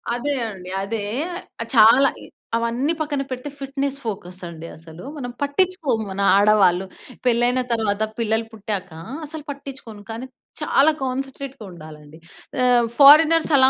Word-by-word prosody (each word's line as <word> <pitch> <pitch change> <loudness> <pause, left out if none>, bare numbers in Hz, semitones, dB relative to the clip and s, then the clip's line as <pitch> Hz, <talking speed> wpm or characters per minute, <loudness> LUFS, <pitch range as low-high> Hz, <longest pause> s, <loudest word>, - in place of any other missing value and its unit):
అదే 285 +4 -1 0.2
అండి, 185 -2 -9
అదే. 210 +1 -3 0.6
ఆహ్, 230 - -4
చాలా 230 +5 +7
ఇ - - -10 0.3
అవన్నీ 235 +6 0
పక్కన 295 -3 -1
పెడితే 255 +2 -5
ఫిట్‍నెస్ 275 0 -2
ఫోకస్సండి 180 -6 -6
అసలు. 160 +1 -13
మనం 250 -4 -5
పట్టిచ్చుకోము 285 - 0
మన 190 +1 -3
ఆడవాళ్ళు. 200 -3 +4 0.4
పెళ్ళైన 245 +1 +3
తర్వాత 220 -3 0 0.2
పిల్లలు 225 0 0
పుట్టాక 205 -3 -5 0.4
అసలు 305 0 -8
పట్టిచ్చుకోను, 270 -6 -9
కానీ 230 +3 -6 0.4
చాలా 300 0 +4
కాన్సంట్రేట్‌గ 270 0 -5
ఉండాలండి. 155 -2 -12 0.5
ఆహ్, 245 -1 +4
ఫారెనర్సలా 300 -1 +7
240 Hz, 125 wpm, -22 LUFS, 205-275 Hz, 0.6 s, చాలా